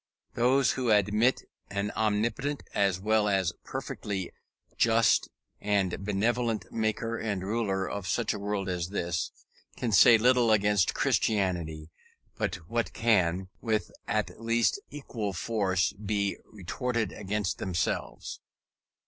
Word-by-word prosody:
Those 125 0 +3
who 125 -3 -1
admit 105 +4 +3 0.3
an 100 +1 -2
omnipotent 115 +7 -1
as 100 -3 +2
well 105 +1 +2
as 95 -4 +1
perfectly 95 -4 -4 0.4
just 115 -2 +3 0.3
and 100 -2 0
benevolent 110 +3 0
maker 115 +1 -1
and 100 -4 -2
ruler 100 -2 -1
of 100 -3 -4
such 115 +3 0
a 105 - -5
world 100 -1 -2
as 90 -1 -2
this, 85 -4 -2 0.5
can 120 - -1
say 110 +4 +8
little 125 +1 +4
against 105 -4 +3
Christianity 85 -7 0 0.4
but - - -1
what 115 +2 -1
can, 95 -5 +2
with 110 -2 -1 0.2
at 110 +1 -2
least 115 - +2
equal 115 -8 -4
force, 95 -2 0
be 100 0 -1
retorted 110 +2 -2
against 105 -1 -2
themselves. 90 -3 -2
105 Hz, 120 wpm, -29 LUFS, 95-115 Hz, 0.5 s, say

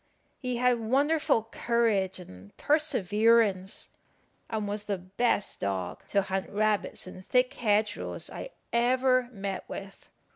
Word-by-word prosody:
He 250 -2 -2
had 250 -1 +3
wonderful 270 +1 +2
courage 225 -6 +1
and 100 - -13
perseverance, 220 - +2 0.6
and 215 -2 -2
was 205 +1 -3
the 200 -2 -1
best 195 +4 -1
dog 95 -3 -3
to 200 -1 +2
hunt 190 0 -3
rabbits 210 0 0
in 185 0 -9
thick 250 +6 +2
hedge 215 -2 +1
rows - - -5
I - - -7 0.2
ever 255 +1 +3
met 195 -3 -5
with. 195 0 -8
215 Hz, 125 wpm, -29 LUFS, 195-245 Hz, 0.6 s, had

